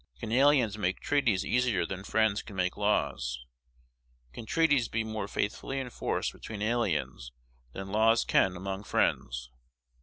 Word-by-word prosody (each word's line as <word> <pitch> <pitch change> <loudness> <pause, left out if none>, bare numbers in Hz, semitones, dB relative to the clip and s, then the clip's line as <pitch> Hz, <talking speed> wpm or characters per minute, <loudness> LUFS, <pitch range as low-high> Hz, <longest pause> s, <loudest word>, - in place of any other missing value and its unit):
Can 110 - -5
aliens 125 -4 +4
make 90 -2 0
treaties 115 -10 +1
easier 125 -3 +1
than 95 0 -6
friends 110 0 +1
can 105 - -11
make 90 -1 0
laws? 65 -12 -1 0.9
Can 110 - -8
treaties 145 -6 +3
be 110 +1 -1
more 110 -2 -4
faithfully 125 +7 -2
enforced 125 -3 -2
between 105 -2 -7
aliens 100 - -1 0.4
than 95 0 -6
laws 110 +2 +4
can 95 -1 +3
among 95 +2 -5
friends? - - 0
105 Hz, 140 wpm, -29 LUFS, 95-115 Hz, 0.9 s, aliens